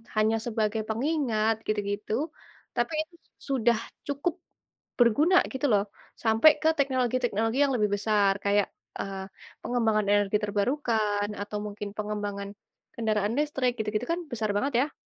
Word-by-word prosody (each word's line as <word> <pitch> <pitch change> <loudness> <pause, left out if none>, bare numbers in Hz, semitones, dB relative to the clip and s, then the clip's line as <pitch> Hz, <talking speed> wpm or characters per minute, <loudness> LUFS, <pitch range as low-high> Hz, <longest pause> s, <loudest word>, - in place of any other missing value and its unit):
hanya 220 +1 +3
sebagai 220 -1 -1
pengingat 225 -3 0
gitu-gitu, 205 0 -2 0.6
tapi 240 +6 0
itu 340 +2 -23 0.3
sudah 240 -3 +3 0.3
cukup 295 +5 -2 0.6
berguna 295 - +5
gitu 275 +2 0
loh, 200 -2 +4 0.4
sampai 225 +7 +7
ke 315 - +4
teknologi-teknologi 250 -4 +1
yang 275 -2 +2
lebih 210 -3 +2
besar 205 -1 +2
kayak, 200 0 +3 0.3
eee, 195 -1 -4 0.3
pengembangan 220 -4 +1
energi 205 0 +3
terbarukan 210 -1 0
atau 205 +1 -4
mungkin 205 0 -5
pengembangan 205 -1 -3 0.5
kendaraan 215 -2 0
listrik 270 -5 0
gitu-gitu 215 +2 -1
kan 340 +1 0
besar 220 -3 -2
banget 270 +7 0
ya? - - -19
220 Hz, 125 wpm, -27 LUFS, 210-255 Hz, 0.6 s, sampai